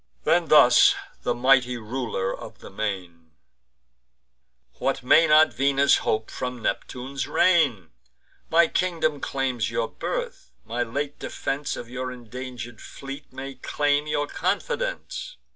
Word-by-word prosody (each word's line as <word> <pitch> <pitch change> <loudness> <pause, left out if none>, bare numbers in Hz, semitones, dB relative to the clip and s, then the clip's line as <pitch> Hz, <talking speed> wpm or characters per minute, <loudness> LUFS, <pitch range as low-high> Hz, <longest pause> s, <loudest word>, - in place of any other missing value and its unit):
Then - - +2
thus - - +7 0.3
the 120 - -1
mighty 125 0 +3
Ruler 110 -4 -3
of - - -11
the - - -12
Main: 90 -6 -5 1.5
"What 135 -1 -1
may 160 +6 +6
not 155 0 +6
Venus 140 +1 +3
hope 110 0 -1
from 125 -2 -5
Neptune's 130 +2 -3
reign? 140 - +2 0.6
My 170 +1 +5
kingdom 160 -5 0
claims 130 -4 -1
your - - -1
birth; - - -5 0.2
my 120 +2 -3
late 140 +5 -3
defence 140 +1 -3
Of 120 - -7
your 125 +1 -5
indanger'd 125 -1 -8
fleet 135 +1 -9
may 135 +1 -7
claim 145 +3 0
your 145 -1 0
confidence. - - -3
130 Hz, 125 wpm, -25 LUFS, 120-145 Hz, 1.5 s, thus